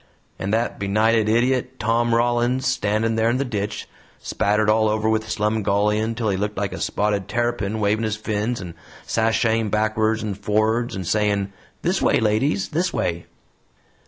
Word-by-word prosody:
And 95 - -2
that 115 +2 0
benighted 110 +2 +2
idiot, 125 +3 +1
Tom 115 +1 +1
Rollins, 120 +2 +1
standin' 115 -3 +1
there 110 +1 +3
in 120 - +1
the 140 - -1
ditch, 105 -4 -4 0.3
spattered 105 +1 0
all 110 0 +3
over 110 0 0
with 110 0 +1
slumgullion 105 0 0
'til 115 -2 -1
he 95 - 0
looked 105 +2 -3
like 100 -1 -2
a - - -6
spotted 105 -2 -1
tarrypin, 110 -3 -1
wavin' 105 +2 +1
his 110 -1 -1
fins 110 +2 -2
and 90 -3 -7 0.3
sashaying 115 0 +1
backwards 110 +1 +1
and 100 -2 -4
forrards 110 +3 0
and 95 -1 -4
sayin', 100 +1 0 0.3
'This 185 +3 +1
way, - - +3
ladies; 105 -2 +1
this 175 +4 0
way!'" 85 0 -2
110 Hz, 160 wpm, -22 LUFS, 105-115 Hz, 0.3 s, there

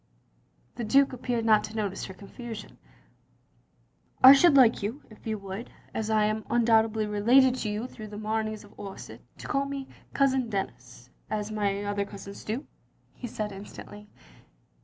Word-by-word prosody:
The 240 - -3
Duke 270 +5 +4
appeared 240 -2 -2
not 215 -2 +5
to 215 - -10
notice 200 -3 -2
her 190 - -8
confusion. 220 +3 -9 1.4
"I 260 +1 +12
should 285 +2 +6
like 250 -4 +6
you 225 +8 -4
— - - -26
^if 215 - -13
you 220 -1 -1
would 195 +3 -7
— - - -28
as 220 -1 -2
I 215 -1 +3
am 215 +1 -1
undoubtedly 225 -2 +3
related 240 +6 +4
to 220 - -2
you 210 +3 -3
through 220 -4 -9
the 210 0 -9
Mameys 215 0 -2
of 205 - -18
Orsett, 195 -1 -8
— - - -36
^to - - -9
call 275 -1 0
me 275 -1 -5 0.2
Cousin 265 -3 +2
Denis 125 - -6
— - - -38
as 210 0 -3
my 205 -1 -1
other 205 0 -1
cousins 200 0 -10
do 235 +7 -3 0.2
— - - -39
" - - -38
he 245 - -3
said 215 -2 -4
instantly. 205 +1 -10
215 Hz, 185 wpm, -28 LUFS, 205-240 Hz, 1.4 s, I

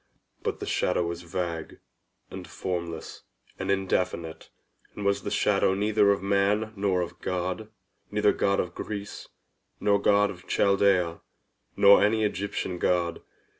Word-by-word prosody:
But - - -3
the - - -5
shadow 85 - 0
was 85 0 -4
vague, 85 -1 -4 0.5
and 95 -2 -8
formless, 85 -3 -5 0.4
and 95 - -3
indefinite, 90 -4 -1 0.5
and 105 - -5
was 100 0 +1
the - - -4
shadow 95 - +2
neither 105 0 +3
of 100 -1 +1
man 100 +2 +1
nor 100 -2 +1
of 85 0 -6
God—neither 100 +2 -2
God 100 0 +1
of 90 - -2
Greece, 105 -1 -6 0.5
nor 100 -1 +2
God 105 0 +3
of 90 -1 -13
Chaldaea, 100 -4 +2 0.5
nor 100 0 +7
any 110 +1 +2
Egyptian 100 -3 -2
God. 85 -2 0
100 Hz, 130 wpm, -27 LUFS, 90-100 Hz, 0.5 s, nor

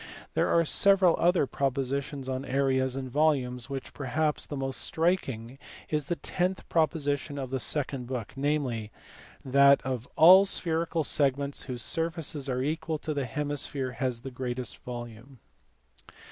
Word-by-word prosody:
There - - +1
are 165 0 +3
several 190 +1 +5
other 175 -3 +3
propositions 135 +1 -2
on 130 0 -3
areas 130 -1 0
and 135 -1 -4
volumes 130 -3 +1
of - - -18
which 135 -1 -6
perhaps 150 +3 -1
the 145 - -5
most 135 0 -3
striking 135 -8 -1 0.3
is 150 -2 -1
the 175 - -1
tenth 180 +4 -2
proposition 145 -3 0
of 130 -2 -5
the 135 - -1
second 135 -2 -1
book, 125 -4 -5
namely 135 -6 -1 0.5
that 140 +1 +6
"of 130 -2 -4
all 185 +5 +9
spherical 165 -3 0
segments 140 -1 +1
whose 125 -3 -3
surfaces 165 -4 -1
are 130 0 -1
equal 160 +2 -2
the 145 -3 -3
hemisphere 145 0 -2
has 125 -3 -3
the 135 - -7
greatest 125 -1 -4
volume." 120 +1 -9
140 Hz, 145 wpm, -28 LUFS, 130-155 Hz, 0.5 s, all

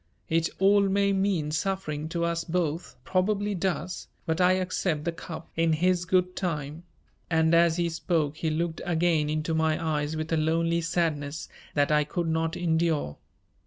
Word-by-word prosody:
It 165 0 +2
all 200 +2 +5
may 200 0 +2
mean 190 -6 0
suffering 160 -3 -2
to 170 0 -1
us 170 0 -1
both, 165 -1 -2
probably 205 +2 0
does, 180 -1 -2 0.2
but 160 +2 0
I 180 +1 +5
accept 180 -4 -1
the 170 - -1
cup 165 0 -9
in 165 0 +2
His 180 +2 +2
good 180 0 +1
time," 150 -4 -3 0.5
and 160 -1 +3
as 170 0 +4
he 170 -1 +1
spoke 160 -3 -1
he 160 - -1
looked 160 +1 -2
again 165 -3 +1
into 155 +1 -1
my 160 0 +1 0.2
eyes 150 +2 -3
with 155 +1 -3
a - - +3
lonely 165 +2 +1
sadness 160 -3 -1 0.3
that 145 0 +2
I 150 0 +4
could 170 +3 -3
not 160 +1 0
endure. 160 - 0
165 Hz, 165 wpm, -27 LUFS, 155-180 Hz, 0.5 s, all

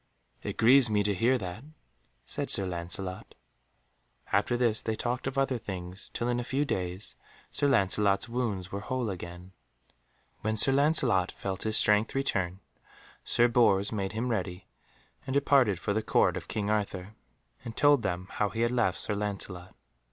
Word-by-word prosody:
"It - - -5
grieves 125 +2 +6
me 105 -1 +2
to 100 0 +1
hear 120 +7 +2
that," 95 +1 -6 0.6
said - - -3
Sir 95 - +3
Lancelot. 90 +1 -5 1.0
After 120 - +2
this 115 -3 +1
they 110 - -2
talked 120 +4 -3
of 135 0 -4
other 135 -2 +1
things, 95 -3 -6
till 120 - -2
in 120 0 0
a - - -2
few 135 +4 -1
days 90 -4 -3 0.4
Sir 145 - +1
Lancelot's 100 -4 +2
wounds 115 -7 -3
were 100 - -3
whole 125 0 -2
again. 90 0 -8 0.9
When 110 +1 -1
Sir 135 - +6
Lancelot 135 - +3
felt 95 -1 -5
his 110 0 +2
strength 105 +3 +3
return, 95 -9 -1 0.6
Sir 120 - +3
Bors 105 -5 +3
made 100 -3 -3
him 115 +3 -2
ready, 95 -4 -3 0.6
and 130 - -2
departed 135 -8 +3
for 100 - -2
the 110 - 0
Court - - +2
of - - -6
King 105 -1 -2
Arthur, 100 -2 -2 0.5
and 115 -2 -8
told 145 -2 +5
them 90 -3 -3
how 105 - 0
he 115 - -4
had 120 +1 +2
left 115 -7 +1
Sir - - +2
Lancelot. 100 -3 -4
105 Hz, 165 wpm, -29 LUFS, 95-120 Hz, 1.0 s, grieves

